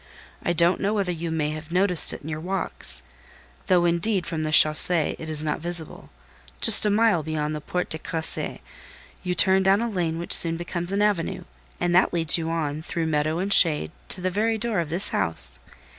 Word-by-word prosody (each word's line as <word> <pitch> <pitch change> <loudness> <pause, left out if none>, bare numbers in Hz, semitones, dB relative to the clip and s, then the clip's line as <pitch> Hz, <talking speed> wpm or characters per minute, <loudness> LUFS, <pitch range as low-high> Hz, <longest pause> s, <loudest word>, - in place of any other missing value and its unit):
"I - - -2
don't 170 +1 +1
know 205 +2 -1
whether 195 -3 -1
you 170 -1 -5
may 155 -2 -2
have 155 +1 -9
noticed 180 -1 +6
it - - -8
in - - -10
your 155 -1 -5
walks: 170 - -4 0.6
though, 180 -2 +2
indeed, 175 +2 0
from 165 -2 -4
the 155 - -3
chaussée 155 +1 +4
it 160 - -8
is 155 -1 -1
not 150 - -3
visible; 170 -2 -5 0.5
just - - +6
a - - +2
mile 210 -4 +2
beyond 155 0 -4
the 150 - -6
Porte 180 +4 -4
de 160 - -3
Crécy, 160 0 -5 0.6
you 180 -1 -3
turn 190 +2 +3
down 195 +1 +2
a 235 - -2
lane 175 -7 -3
which 170 - -3
soon 165 -1 +3
becomes 175 +1 -4
an 200 +1 0
avenue, 205 -6 -2 0.4
and 175 - -1
that 180 0 +2
leads 165 -2 +2
you 165 -1 -3
on, 155 -2 -3
through 165 0 -4
meadow 155 0 -1
and 195 +3 -1
shade, 150 - +4 0.2
to 185 - -1
the 185 0 -2
very 220 +4 -1
door 220 -3 -2
of 165 -3 -4
this 175 +6 -1
house. 80 -7 +2
170 Hz, 205 wpm, -23 LUFS, 155-190 Hz, 0.6 s, noticed